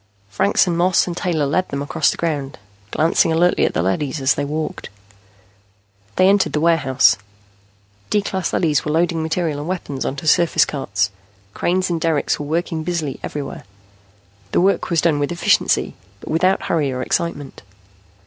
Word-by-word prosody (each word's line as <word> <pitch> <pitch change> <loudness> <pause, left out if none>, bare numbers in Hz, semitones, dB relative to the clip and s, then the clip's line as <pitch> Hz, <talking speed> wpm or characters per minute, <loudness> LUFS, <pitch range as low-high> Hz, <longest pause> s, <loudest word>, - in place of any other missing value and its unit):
Franks 200 - +2
and 175 -2 -1
Moss 175 +1 +3
and 175 - -4
Taylor 165 -5 -1
led 185 +7 0
them 140 0 -3
across 160 +2 +1
the - - -2
ground, 145 -5 -3 0.3
glancing 160 +6 +2
alertly 175 +2 +3
at - - -5
the 85 - +1
leadys 135 - -1
as 135 0 +3
they 145 - -3
walked. 155 +2 -4 1.3
They 185 - +4
entered 200 0 +3
the 150 - +1
warehouse. 135 -9 +3 0.9
D 210 -1 +1
class 190 -2 -2
leadys 155 -4 +1
were 150 - -2
loading 165 +1 +1
material 160 -2 -1
and 150 - -6
weapons 170 -7 -4
on 140 - -3
surface 160 +1 +3
carts. 100 -8 -2 0.4
Cranes 185 +1 0
and 165 -2 -2
derricks 160 -3 0
were 145 - -5
working 165 0 -2
busily 160 -5 -3
everywhere. 145 -1 -6 0.9
The - - +3
work 195 +2 +1
was 170 -3 +2
done 160 -4 +2
with 145 +2 -1
efficiency, 175 - +1 0.3
but - - -8
without 185 +4 +2
hurry 150 -5 0
or 130 0 -3
excitement. 145 -4 -3
160 Hz, 165 wpm, -20 LUFS, 145-175 Hz, 1.3 s, They